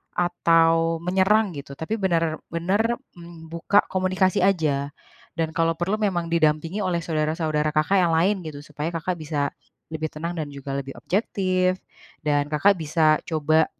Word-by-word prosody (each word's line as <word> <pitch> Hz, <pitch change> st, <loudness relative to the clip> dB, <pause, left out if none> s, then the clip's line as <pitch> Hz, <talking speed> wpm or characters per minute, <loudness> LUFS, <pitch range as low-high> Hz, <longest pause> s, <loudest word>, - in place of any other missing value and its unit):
atau 165 Hz, -1 st, +2 dB
menyerang 190 Hz, +3 st, +3 dB
gitu, 140 Hz, 0 st, -8 dB
tapi 215 Hz, +8 st, -3 dB
benar-benar 180 Hz, +4 st, 0 dB, 0.5 s
buka 170 Hz, +5 st, +3 dB
komunikasi 185 Hz, -1 st, +1 dB
aja. 145 Hz, -7 st, +1 dB, 0.4 s
Dan, 165 Hz, -1 st, 0 dB
kalau 165 Hz, +1 st, +2 dB
perlu 190 Hz, +5 st, 0 dB
memang 175 Hz, -5 st, 0 dB
didampingi 165 Hz, +3 st, +1 dB
oleh 175 Hz, -2 st, 0 dB
saudara-saudara 155 Hz, -1 st, -1 dB
Kakak 155 Hz, +6 st, +2 dB
yang 170 Hz, -2 st, +2 dB
lain, 190 Hz, +4 st, +2 dB
gitu, 145 Hz, -2 st, -7 dB
supaya 150 Hz, +1 st, -4 dB
Kakak 170 Hz, +2 st, -2 dB
bisa 145 Hz, -2 st, -1 dB, 0.4 s
lebih 160 Hz, 0 st, -3 dB
tenang, 165 Hz, +3 st, -4 dB
dan 155 Hz, -, -2 dB
juga 140 Hz, 0 st, -6 dB
lebih 135 Hz, -1 st, -5 dB
objektif, 185 Hz, -2 st, 0 dB, 0.4 s
dan 145 Hz, -1 st, +2 dB
Kakak 185 Hz, +6 st, +3 dB
bisa 155 Hz, 0 st, +3 dB
coba 155 Hz, 0 st, +2 dB
165 Hz, 140 wpm, -24 LUFS, 155-185 Hz, 0.5 s, menyerang